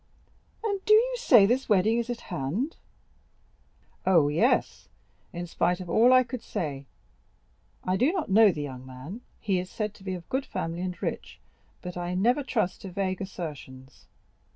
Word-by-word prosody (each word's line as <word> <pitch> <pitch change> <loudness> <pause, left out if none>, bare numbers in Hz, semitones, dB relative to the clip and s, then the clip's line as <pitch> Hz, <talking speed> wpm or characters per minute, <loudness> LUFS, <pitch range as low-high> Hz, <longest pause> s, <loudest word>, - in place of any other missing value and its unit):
"And 400 -3 -2
do 430 - +6
you - - +3
say 245 - +6
this 250 +5 0
wedding 215 +3 +3
is 235 +1 -3
at 240 -1 -4
hand?" 180 - -3 1.3
"Oh, 170 -6 +4
yes, 210 - +1 0.4
in 175 0 -5
spite 175 +1 0
of 180 -2 -6
all 235 +7 +5
I 255 0 +7
could 250 -1 -6
say. 140 -8 -4 1.0
I 185 +1 0
do 260 +9 +3
not 370 -4 -2
know 210 +1 +6
the 150 -4 -4
young 130 -3 -7
man; 130 - -9 0.2
he 195 -4 0
is 180 0 -5
said 210 0 -3
to 200 - -17
be 190 -1 -3
of 175 -2 -10
good 265 +1 -2
family 165 +1 -4
and 180 -1 -4
rich, - - -4 0.4
but 180 -1 -6
I 175 0 -3
never 240 +9 +2
trust 220 -9 -1
to 195 - -7
vague 185 0 -2
assertions. 145 -8 -8
190 Hz, 175 wpm, -27 LUFS, 175-240 Hz, 1.3 s, I